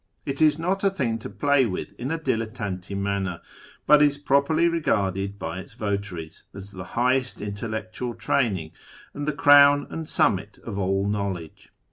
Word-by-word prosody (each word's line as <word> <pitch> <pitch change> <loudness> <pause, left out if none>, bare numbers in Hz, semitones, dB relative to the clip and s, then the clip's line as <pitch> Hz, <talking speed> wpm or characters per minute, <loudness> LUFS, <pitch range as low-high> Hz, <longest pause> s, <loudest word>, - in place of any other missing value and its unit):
It 140 +2 -3
is 155 -1 +5
not 185 +4 -1
a 195 - +5
thing 125 -11 -2
to - - -7
play 135 +6 +2
with 100 0 -5
in 125 - -3
a 165 - -1
dilettante 110 - -3
manner, 100 -3 -2 0.5
but 150 0 +6
is 145 -1 +4
properly 145 +4 +2
regarded 100 - 0
by 80 0 -5
its 95 - -11
votaries 100 -6 -4
as 100 0 -9
the 95 -2 -7
highest 125 +1 +1
intellectual 110 +3 -5
training, 115 - 0 0.4
and 145 +1 -5
the - - +2
crown 145 0 +6
and 160 -1 -5
summit 100 +1 +1
of 100 -3 -5
all 95 +1 0
know 100 -1 -1
ledge. 80 -3 -11
110 Hz, 165 wpm, -25 LUFS, 100-145 Hz, 0.5 s, but